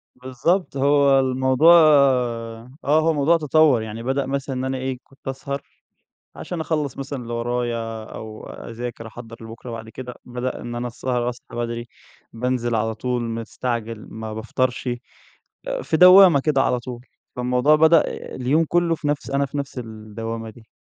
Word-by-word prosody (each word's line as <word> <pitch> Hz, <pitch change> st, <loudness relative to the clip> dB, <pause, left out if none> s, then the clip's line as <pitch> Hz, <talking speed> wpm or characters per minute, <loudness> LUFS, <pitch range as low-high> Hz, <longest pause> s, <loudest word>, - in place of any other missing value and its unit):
بالضبط. 135 Hz, +7 st, -1 dB
هو 140 Hz, 0 st, +4 dB
الموضوع 130 Hz, +5 st, +4 dB
آه. 125 Hz, -7 st, +3 dB
هو 155 Hz, +3 st, +3 dB
الموضوع 160 Hz, +2 st, +3 dB
تطوَّر، 150 Hz, -5 st, +4 dB
يعني 110 Hz, +1 st, -6 dB
بدأ 135 Hz, +2 st, 0 dB
مثلًا 135 Hz, 0 st, -3 dB
إن 130 Hz, +1 st, -2 dB
أنا 130 Hz, 0 st, -2 dB
إيه، 130 Hz, 0 st, -3 dB
كنت 135 Hz, 0 st, -20 dB
أسهر 135 Hz, +1 st, -4 dB, 0.8 s
عشان 175 Hz, -3 st, -5 dB
أخلّص 150 Hz, -5 st, -2 dB
مثلًا 135 Hz, -1 st, -5 dB
اللي 120 Hz, 0 st, -7 dB
ورايا 115 Hz, -2 st, -2 dB
أو 110 Hz, 0 st, -9 dB
أذاكر 115 Hz, 0 st, -7 dB
أحضّر 115 Hz, 0 st, -10 dB
لبُكرة 115 Hz, +2 st, -9 dB
وبعد 110 Hz, -1 st, -7 dB
كده 125 Hz, +1 st, -8 dB
بدأ 125 Hz, +1 st, -4 dB
إن 120 Hz, 0 st, -6 dB
أنا 120 Hz, +1 st, -3 dB
السهر 120 Hz, 0 st, -2 dB
أصحى 125 Hz, 0 st, -7 dB
بدري، 120 Hz, 0 st, -3 dB, 0.5 s
بانزل 120 Hz, 0 st, -1 dB
على 110 Hz, 0 st, 0 dB
طول 125 Hz, +2 st, -2 dB
مستعجل 115 Hz, -1 st, -4 dB
ما 110 Hz, 0 st, -6 dB
بافطرش، 125 Hz, +3 st, -2 dB, 0.8 s
آآ -, -, -2 dB
في 160 Hz, -, 0 dB
دوّامة 180 Hz, -4 st, +8 dB
كده 135 Hz, -2 st, +2 dB
على 125 Hz, -, +1 dB
طول. 125 Hz, 0 st, -8 dB, 0.3 s
فالموضوع 125 Hz, +4 st, +3 dB
بدأ 160 Hz, +1 st, +6 dB, 0.3 s
اليوم 140 Hz, +6 st, +2 dB
كُلّه 175 Hz, -1 st, +2 dB
في 150 Hz, -2 st, -4 dB
نفس 145 Hz, -1 st, -2 dB
أنا 140 Hz, +1 st, +1 dB
في 145 Hz, -, -6 dB
نفس 140 Hz, -2 st, -5 dB
الدوّامة 115 Hz, 0 st, -6 dB
دي. 110 Hz, 0 st, -18 dB
125 Hz, 160 wpm, -22 LUFS, 115-140 Hz, 0.8 s, دوّامة